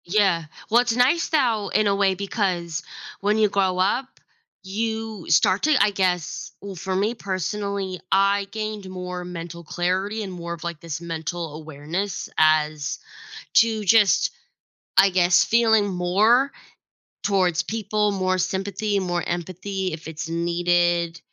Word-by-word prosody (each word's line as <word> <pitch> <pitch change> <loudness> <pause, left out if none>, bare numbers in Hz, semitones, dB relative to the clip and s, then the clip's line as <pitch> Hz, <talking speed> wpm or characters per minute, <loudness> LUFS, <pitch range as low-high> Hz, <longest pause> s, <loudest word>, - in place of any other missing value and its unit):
Yeah, 185 -3 +2 0.3
well, 235 +2 +5
it's 240 -2 0
nice 270 +8 +3
thou, 235 -9 +1
in 215 - +2
a 200 - +2
way, 195 -1 +2
because 180 -4 -2 0.4
when 205 +2 +1
you 215 -1 +4
grow 190 -2 +1
up, 205 +8 +1 0.6
you 220 0 -3
start 190 +3 +3
to, 310 0 +4
I 205 - +5
guess 180 -4 -1
well, 200 -1 -7
for 190 +2 -3
me 205 +4 +1
personally, 195 -1 -3
I 195 +1 +3
gained 215 -3 -5
more 180 -1 -5
mental 170 -1 -7
clarity 185 +6 -1
and 195 - -6
more 170 -1 -6
of, 170 - -9
like, 170 -2 -5
this 165 0 -6
mental 165 -1 -4
awareness 160 +5 -4
as 155 -1 +2 0.6
to, 225 -1 +4
just, 205 0 +4 0.7
I 195 - +7
guess, 180 -1 +4
feeling 220 -2 +3
more 205 +9 +3 0.7
towards 185 -4 +2
people, 210 -1 -1
more 185 -1 0
sympathy, 200 +3 -1
more 175 -2 -1
empathy, 185 +2 -3
if 160 0 -8
it's 160 0 -6
needed, 170 0 +1
190 Hz, 140 wpm, -23 LUFS, 175-210 Hz, 0.7 s, I